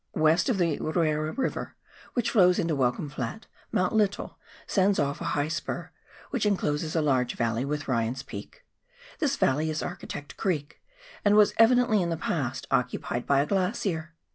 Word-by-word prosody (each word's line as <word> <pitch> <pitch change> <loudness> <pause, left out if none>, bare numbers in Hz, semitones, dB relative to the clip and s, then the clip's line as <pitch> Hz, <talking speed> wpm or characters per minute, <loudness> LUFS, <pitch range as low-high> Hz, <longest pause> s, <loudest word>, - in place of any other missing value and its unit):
West 160 - +3
of 240 - +2
the 170 -5 +1
Ruera 155 -1 0
River, 265 - -2 0.4
which 235 -2 +1
flows 180 -4 +5
into 165 -2 0
Welcome 130 +1 0
Flat, 135 - -5 0.3
Mount 185 +3 +1
Lyttle 210 -3 0 0.3
sends 195 0 +2
off 140 0 -1
a - - -1
high 145 +1 +1
spur, 155 0 -4 0.4
which 250 - -1
encloses 160 -6 0
a 160 - +2
large 130 -4 +1
valley 115 +1 0
with 145 0 -3
Ryan's 120 +1 -1
Peak. - - -10 0.5
This 290 -3 +1
valley 155 - +1
is 155 0 -2
Architect 170 -5 -7
Creek, 155 -6 -2 0.4
and 205 0 +4
was 210 -1 +6
evidently 235 -2 +5
in 170 - -1
the 165 - -1
past 135 -6 -2
occupied 125 -1 -1
by 140 -1 +4
a - - 0
glacier. 180 -3 -1
160 Hz, 165 wpm, -27 LUFS, 145-200 Hz, 0.5 s, was